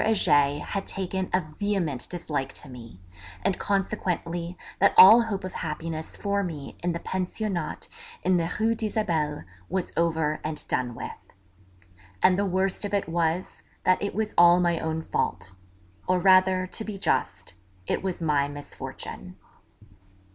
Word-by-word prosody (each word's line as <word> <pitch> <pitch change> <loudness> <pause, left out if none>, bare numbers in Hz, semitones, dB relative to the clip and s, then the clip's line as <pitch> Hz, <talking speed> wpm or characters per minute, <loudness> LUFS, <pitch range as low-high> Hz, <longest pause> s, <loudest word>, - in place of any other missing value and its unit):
Heger 145 -9 +3
had 195 -1 -3
taken 190 -1 -3
a 185 - +2
vehement 155 -4 -2
dislike 150 -6 -3
to - - -5
me, 115 -7 -11 0.4
and 195 - 0
consequently 180 -3 -2 0.2
that 200 - +4
all 220 +5 +10
hope 210 -5 -3
of 185 - -5
happiness 160 +1 -5
for 200 0 0
me 155 -6 -6
in 175 0 0
the 170 - -3
Pensionnat 185 -1 -3 0.4
in 185 -1 +3
the 165 0 -1
Rue 225 +1 +3
d'Isabelle 195 - -1 0.3
was 190 -2 -2
over 160 -2 +1
and 155 -1 -4
done 125 -2 -1
with. - - -6 1.1
And 185 - +6
the 200 - +1
worst 190 +2 0
of 205 0 -1
it 200 - 0
was, 170 +2 -1 0.2
that 185 - +3
it 200 - -3
was 215 0 -1
all 175 0 +7
my 170 -2 +2
own 160 0 -2
fault; 95 - -2 0.6
or 185 - +3
rather, 185 0 +5
to 205 +4 -3
be 215 -2 -6
just, 195 - -1 0.3
it - - -1
was 185 -3 -3
my 145 -3 +2
misfortune. 145 0 -8
180 Hz, 150 wpm, -26 LUFS, 160-195 Hz, 1.1 s, all